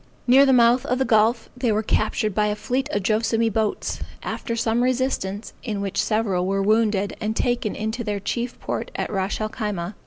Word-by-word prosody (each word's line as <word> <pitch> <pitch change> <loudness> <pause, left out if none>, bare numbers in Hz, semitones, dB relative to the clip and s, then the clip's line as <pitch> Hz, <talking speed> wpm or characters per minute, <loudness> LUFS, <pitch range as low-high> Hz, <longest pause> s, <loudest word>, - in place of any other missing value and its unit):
Near 270 +3 +6
the - - +5
mouth 245 0 +5
of 250 - +1
the 265 - +1
gulf, 225 0 +3
they 250 -2 0
were 215 +1 +1
captured 215 0 0
by 210 +1 +2
a 210 - 0
fleet 260 +5 -2
of 205 -8 -1
Joassamee 225 +1 +1
boats, 220 -1 -1 0.2
after 230 - -3
some 230 +1 +1
resistance, 250 -5 -1
in 215 -5 -3
which 200 -1 -1
several 200 -5 0
were 195 0 0
wounded 210 -1 +2
and 215 0 -1
taken 240 -3 0
into 220 +3 -3
their 205 -2 -2
chief 240 +4 -3
port - - -4
at - - -3
Ras 195 -1 -1
el 215 0 -2
Khyma. 205 -4 -4
220 Hz, 195 wpm, -23 LUFS, 205-240 Hz, 0.2 s, Near